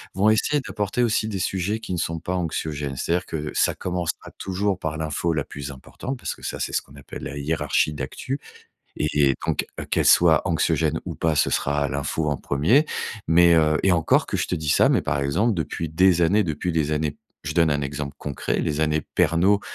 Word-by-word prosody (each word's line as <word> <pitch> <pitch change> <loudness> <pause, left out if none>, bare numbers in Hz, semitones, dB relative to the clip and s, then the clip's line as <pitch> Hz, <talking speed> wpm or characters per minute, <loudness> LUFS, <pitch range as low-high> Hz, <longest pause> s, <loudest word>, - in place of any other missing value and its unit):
Vont 100 +3 +4
essayer 140 +7 +2
d'apporter 105 +4 -1
aussi 110 -2 +1
des 100 -3 -3
sujets 95 +4 -1
qui 110 -4 -5
ne - - -1
sont 85 0 -2
pas 90 +3 -3
anxiogènes, 75 -5 -3
c'est-à-dire 85 +7 -1
que 75 -2 -4
ça - - +2
commencera 90 -2 -3
toujours 95 0 -1
par 80 -2 -3
l'info 80 +2 -1
la 75 -2 0
plus 70 0 -7
importante. 120 - -7
Parce - - -4
que - - -19
ça, - - -4
c'est - - -3
ce - - +1
qu'on 70 - -18
appelle 70 - -10
la 70 - -5
hiérarchie 75 +1 0
d'actu 75 - -4 0.6
et 75 - 0 0.2
et - - +1
donc - - 0 0.2
qu'elle - - +2
soit 80 -3 +6
anxiogène 85 -2 +1
ou - - -5
pas, 80 -1 +1
ce 70 - +2
sera 70 0 0
l'info 70 +3 -1
en 75 - 0
premier. 100 - +2 0.4
Mais, 85 +1 +6
heu 80 -1 +4
et 95 - +4
encore 80 -2 +3
que - - -2
je - - -1
te - - -1
dis 80 -3 -4
ça, - - +5
mais - - +2
par - - -1
exemple, 85 +12 +1
depuis 80 0 -3
des 90 +1 +4
années 100 +6 +3
depuis 80 +2 -2
des 75 -2 0
années, 75 -1 -1 0.3
je 75 0 -4
donne 85 -2 +4
un 70 0 0
exemple 70 0 -4
concret. 70 -2 -2
Les 75 0 -1
années 80 0 +2
Pernault 90 +6 +2
80 Hz, 215 wpm, -24 LUFS, 75-90 Hz, 0.6 s, soit